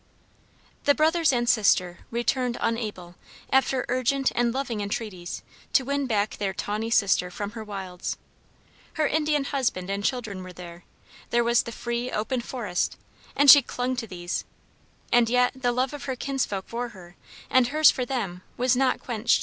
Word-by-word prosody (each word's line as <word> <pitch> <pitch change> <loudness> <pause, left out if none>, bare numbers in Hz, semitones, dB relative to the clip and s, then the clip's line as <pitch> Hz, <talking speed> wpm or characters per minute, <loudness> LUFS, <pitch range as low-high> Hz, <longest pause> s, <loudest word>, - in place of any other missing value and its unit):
The 285 - +5
brothers 320 0 +3
and 240 -2 0
sister 185 -6 +3
returned 240 +1 0
unable, 210 -7 -3 0.4
after 265 -1 +2
urgent 255 +2 +1
and 240 -1 +2
loving 245 -4 -2
entreaties, 200 -4 -5 0.3
to 265 - +4
win 280 0 -1
back 210 -3 0
their 195 -2 -2
tawny 215 +2 -2
sister 200 -5 +3
from 200 +3 -5
her 225 -1 -7
wilds. 190 -4 -5 0.8
Her 310 - +1
Indian 300 -1 +1
husband 245 -10 -1
and 200 +1 -2
children 220 -6 -2
were 185 0 -9
there; 175 0 -11 0.4
there 240 0 +2
was 235 0 +3
the 235 - -7
free, 235 +2 -3
open 240 +4 -1
forest, 225 -8 -2 0.4
and 285 - +3
she 285 - +10
clung 250 0 -2
to 230 -2 -3
these; 175 -2 -4 0.7
and 240 -1 +5
yet 250 +1 +3
the 250 -2 0
love 255 +3 0
of 290 - -7
her 265 -2 -2
kinsfolk 250 -7 -2
for 240 +1 -4
her, 180 -5 -14 0.4
and 255 -2 +5
her's 305 +3 +6
for 255 - -3
them, 220 -9 -3 0.2
was 250 +1 +3
not 260 0 +2
quenched. 235 -2 +1
240 Hz, 165 wpm, -26 LUFS, 200-260 Hz, 0.8 s, she